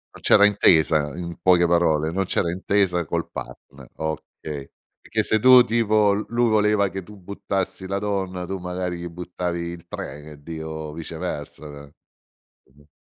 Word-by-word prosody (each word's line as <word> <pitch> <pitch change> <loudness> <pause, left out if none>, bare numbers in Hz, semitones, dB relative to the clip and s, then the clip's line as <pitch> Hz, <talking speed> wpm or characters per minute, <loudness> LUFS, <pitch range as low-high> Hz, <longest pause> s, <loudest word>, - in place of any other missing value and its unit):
Non - - -13
c'era 100 - +6
intesa, 80 -7 +3
in 85 -1 -6
poche 90 -2 +5
parole, 80 -2 +2
non 95 +3 -1
c'era 85 -1 0
intesa 95 -1 +1
col - - -3
partner, 70 -2 -10
okay. 75 -2 -6 0.3
Perché - - -1
se 110 - +1
tu 125 +1 +8
tipo, 110 -3 +2
l 105 +2 -1
lui 120 0 +2
voleva 105 -2 +3
che 95 +1 -5
tu 105 +3 -14
buttassi 95 0 -4
la 100 - -2
donna, 95 -3 -3
tu 95 +1 -4
magari 90 0 -4
gli 85 - -5
buttavi 90 0 -4
il 85 0 -6
3 75 - -7
e 75 - -11
e 70 -1 -17
dico, 80 -1 -6
viceversa. 75 -3 -7 0.8
Mh-mh. 75 +1 -23
90 Hz, 160 wpm, -23 LUFS, 80-100 Hz, 0.8 s, tu